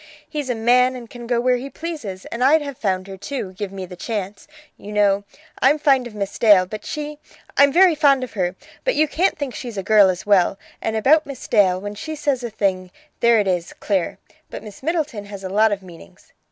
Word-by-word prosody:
He's 295 -4 -4
a 245 - 0
man 250 +3 +3
and 240 -2 -9
can 240 0 -10
go 240 -1 +1
where 250 +1 +2
he 265 +3 -6
pleases, 275 - -6
and 235 +2 -2
I'd 300 +3 +5
have 280 -2 -6
found 185 -5 -1
her, 195 -1 -9
too, 200 -1 -5
give 195 +1 -5
me 190 -1 -6
the 180 - -10
chance. 200 0 -5 0.3
You 205 - -10
know. 205 -1 +2 0.4
I'm 275 +4 +5
fond 270 -4 +3
of 220 - -12
Miss 200 -1 -4
Dale, 205 -5 +6
but 210 +3 -8
she 300 -1 -5 0.4
I'm 280 0 +6
very 360 +3 +6
fond 280 -4 +3
of 255 - -7
her 185 -3 -1 0.3
but - - +1
you 310 +1 +3
can't 355 +6 +1
think 285 -4 -4
she's 240 -5 -7
a 195 - -2
girl 205 -1 +6
as 185 0 -3
well. 195 -2 +3 0.2
And 220 - -2
about 290 +8 +4
Miss 275 -3 -8
Dale, 190 -5 +3
when 205 +1 -6
she 315 +9 -6
says 285 -4 -1
a 240 - -3
thing, 190 -3 -1 0.3
there 235 -1 +4
it 205 - 0
is, 180 -2 -1
clear. 190 -5 -2 0.3
But - - -8
Miss 210 -2 -11
Middleton 300 -9 -2
has 200 -1 -9
a 190 - -4
lot 215 +3 +3
of 200 -1 -3
meanings. 170 - -15
220 Hz, 230 wpm, -21 LUFS, 195-275 Hz, 0.4 s, Dale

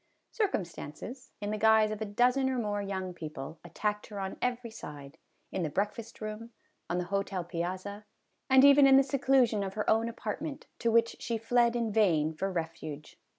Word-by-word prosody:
Circumstances, 235 - -4
in 205 0 -2
the 215 - -2
guise 220 -1 +5
of 215 0 -5
a - - 0
dozen 250 +6 +2
or 260 - -1
more 205 -3 -1
young 190 -2 -4
people, 155 -2 -7
attacked 210 -1 -3
her 205 -2 -7
on 190 0 -4
every 245 -2 -2
side 145 -6 -10 0.3
in 190 - -2
the 160 - -1
breakfast 210 +8 -3
room, 215 +2 -5 0.4
on 175 - 0
the 180 - 0
hotel 195 -2 -1
piazza, 185 +4 -4 0.4
and 265 +1 +7
even 280 0 +8
in 270 0 +8
the 270 - +6
seclusion 265 -5 +2
of 195 0 -5
her 210 - -2
own 225 +1 +3
apartment, 275 +6 -5
to 235 - +1
which 230 0 +3
she 230 -1 -2
fled 235 +1 +2
in 230 -2 0
vain 165 -8 +3
for 195 +5 -2
refuge. 160 -3 -6
215 Hz, 185 wpm, -30 LUFS, 185-235 Hz, 0.4 s, even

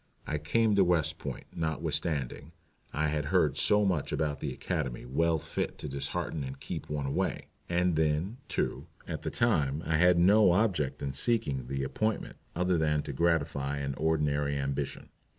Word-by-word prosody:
I 75 - -2
came 110 +8 +2
to 100 - +7
West 85 -4 +1
Point, - - -6
notwithstanding 80 -4 -2 0.4
I 75 +1 0
had 75 -1 -1
heard 85 -2 +2
so 105 0 +3
much 90 -7 0
about 75 -2 -1
the - - -3
Academy 75 -11 -3
well 80 +6 +2
fit - - -3
to - - -6
dishearten 70 +2 -2
and 65 0 -6
keep - - -6
one 75 -2 -2
away. 70 - -1 0.2
And 90 0 +2
then, 80 +8 +1
too, - - -2 0.2
at - - -4
the - - -2
time 75 - +1
I 80 0 +2
had 90 +1 +5
no 95 +2 +6
object 90 -10 +1
in 70 -1 -2
seeking 70 - 0
the 70 +1 -2
appointment 110 +11 -2 0.2
other 90 0 +2
than 75 -1 +1
to 70 - -5
gratify 70 -3 +1
an 70 -1 -2
ordinary 75 -2 +1
ambition. 70 0 -3
75 Hz, 170 wpm, -30 LUFS, 70-90 Hz, 0.4 s, to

